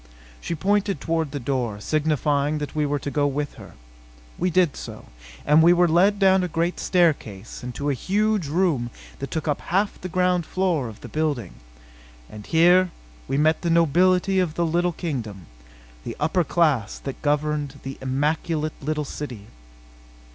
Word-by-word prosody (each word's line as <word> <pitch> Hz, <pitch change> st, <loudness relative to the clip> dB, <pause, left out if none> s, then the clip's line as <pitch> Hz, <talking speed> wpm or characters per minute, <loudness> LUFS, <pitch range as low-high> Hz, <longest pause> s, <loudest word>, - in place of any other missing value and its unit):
She 170 Hz, -, -3 dB
pointed 200 Hz, 0 st, +1 dB
toward 160 Hz, -1 st, -1 dB
the 145 Hz, +1 st, -5 dB
door, 120 Hz, -5 st, -2 dB
signifying 150 Hz, +2 st, 0 dB
that 145 Hz, -1 st, -5 dB
we 150 Hz, -1 st, 0 dB
were 145 Hz, +1 st, 0 dB
to 140 Hz, -, -5 dB
go 145 Hz, 0 st, +1 dB
with 145 Hz, +1 st, -2 dB
her. -, -, -13 dB, 0.6 s
We 180 Hz, -, 0 dB
did 175 Hz, -4 st, +2 dB
so; -, -, -9 dB, 0.4 s
and 150 Hz, +2 st, +5 dB
were 175 Hz, +1 st, +5 dB
led 185 Hz, +5 st, +4 dB
down 190 Hz, -1 st, +4 dB
the 180 Hz, -, -1 dB
great 170 Hz, +1 st, -1 dB
staircase 140 Hz, -, 0 dB
and 125 Hz, 0 st, -7 dB
to 145 Hz, -, -3 dB
a 145 Hz, -, +2 dB
huge 205 Hz, -, 0 dB
room 150 Hz, -7 st, +1 dB, 0.3 s
that 140 Hz, -, -5 dB
took 160 Hz, +2 st, -3 dB
up 145 Hz, -, 0 dB
half 195 Hz, +4 st, -1 dB
the 185 Hz, -, -5 dB
ground 180 Hz, 0 st, +1 dB
floor 175 Hz, -8 st, 0 dB
of 110 Hz, -, -13 dB
the -, -, -8 dB
building. 150 Hz, -6 st, -2 dB, 0.8 s
And 105 Hz, -1 st, -10 dB
here 180 Hz, +3 st, +5 dB, 0.4 s
we 135 Hz, -, -1 dB
met 155 Hz, +2 st, +3 dB
the 170 Hz, -, -1 dB
nobility 180 Hz, +4 st, +3 dB
of 170 Hz, -4 st, 0 dB
the 170 Hz, -, +1 dB
little 175 Hz, +2 st, +1 dB
kingdom 115 Hz, -, -5 dB, 0.6 s
the -, -, -6 dB
upper 165 Hz, +4 st, +1 dB
class 150 Hz, -, +1 dB
that 135 Hz, -, -7 dB
governed 145 Hz, -1 st, -1 dB
the 135 Hz, 0 st, -7 dB
immaculate 150 Hz, +4 st, -1 dB
little 150 Hz, +1 st, -2 dB
city. 125 Hz, -8 st, -7 dB
155 Hz, 170 wpm, -24 LUFS, 140-175 Hz, 0.8 s, and